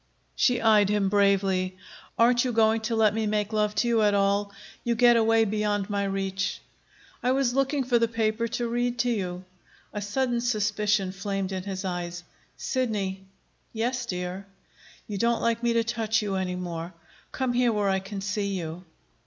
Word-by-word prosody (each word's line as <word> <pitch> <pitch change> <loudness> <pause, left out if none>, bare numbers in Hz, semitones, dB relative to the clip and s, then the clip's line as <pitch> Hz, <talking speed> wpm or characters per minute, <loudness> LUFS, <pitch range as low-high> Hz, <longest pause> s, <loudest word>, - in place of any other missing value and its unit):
She 250 -3 +3
eyed 215 -3 +4
him 205 -2 +1
bravely. 195 -2 +2 0.4
"Aren't 240 +1 +4
you 255 - -1
going 225 0 +3
to 225 +1 -2
let 215 -2 +4
me 220 0 -1
make 210 0 -1
love 210 -1 +1
to 225 +3 +1
you 230 -2 +3
at 205 -1 +3
all? 200 0 +1 0.3
You 235 -1 0
get 240 0 +6
away 225 0 +4
beyond 210 -1 -1
my 200 0 0
reach." 195 0 -2 0.6
"I 250 +1 +2
was 265 -2 +1
looking 275 +1 +1
for 245 -1 +2
the 230 - +3
paper 225 0 0
to 240 +1 -2
read 240 +1 -1
to 245 +1 +1
you." 185 -4 -3 0.5
A 210 - -3
sudden 240 +3 -1
suspicion 210 -4 0
flamed 195 0 -3
in 190 -1 -3
his 195 -1 -4
eyes. 175 -1 -4 0.3
"Sidney." 200 -7 -2 0.5
"Yes, 240 +2 -2
dear." 180 +1 -4 0.6
"You 205 -2 -4
don't 235 +1 +2
like 230 0 0
me 235 -1 +1
to 230 0 +2
touch 220 -1 0
you 200 -2 -2
any 185 -1 -1
more. 175 -1 -5 0.4
Come 260 -2 -1
here 245 -1 +3
where 205 -2 +1
I 190 0 +2
can 195 +1 -7
see 200 -1 -2
you." 165 +1 -6
210 Hz, 180 wpm, -26 LUFS, 195-235 Hz, 0.6 s, get